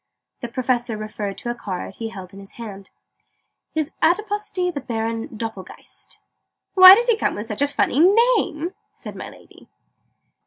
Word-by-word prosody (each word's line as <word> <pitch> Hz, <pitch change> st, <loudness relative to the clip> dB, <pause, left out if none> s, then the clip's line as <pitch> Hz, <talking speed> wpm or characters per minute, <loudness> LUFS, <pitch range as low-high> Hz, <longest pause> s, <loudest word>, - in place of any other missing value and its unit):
The 240 Hz, -, -5 dB
Professor 240 Hz, -2 st, -1 dB
referred 210 Hz, -2 st, -5 dB
to 240 Hz, -3 st, -4 dB
a -, -, -2 dB
card 195 Hz, -5 st, -6 dB
he 225 Hz, -1 st, -4 dB
held 190 Hz, -4 st, -10 dB
in 195 Hz, -, -11 dB
his 195 Hz, 0 st, -13 dB
hand. 200 Hz, -4 st, -9 dB, 0.9 s
"His 310 Hz, 0 st, -1 dB
Adiposity 385 Hz, 0 st, 0 dB
the 285 Hz, -4 st, -5 dB
Baron 225 Hz, -1 st, -3 dB
Doppelgeist." 220 Hz, -4 st, -7 dB, 0.6 s
"Why 370 Hz, 0 st, +11 dB
does 475 Hz, +3 st, +1 dB
he 475 Hz, -2 st, +3 dB
come 440 Hz, -, -1 dB
with 210 Hz, -, -5 dB
such 215 Hz, +2 st, -5 dB
a 285 Hz, -, +4 dB
funny 285 Hz, -1 st, 0 dB, 0.4 s
name?" 340 Hz, -4 st, -2 dB, 0.2 s
said -, -, -8 dB
my -, -, -7 dB
Lady. -, -, -18 dB
240 Hz, 160 wpm, -22 LUFS, 215-335 Hz, 0.9 s, Why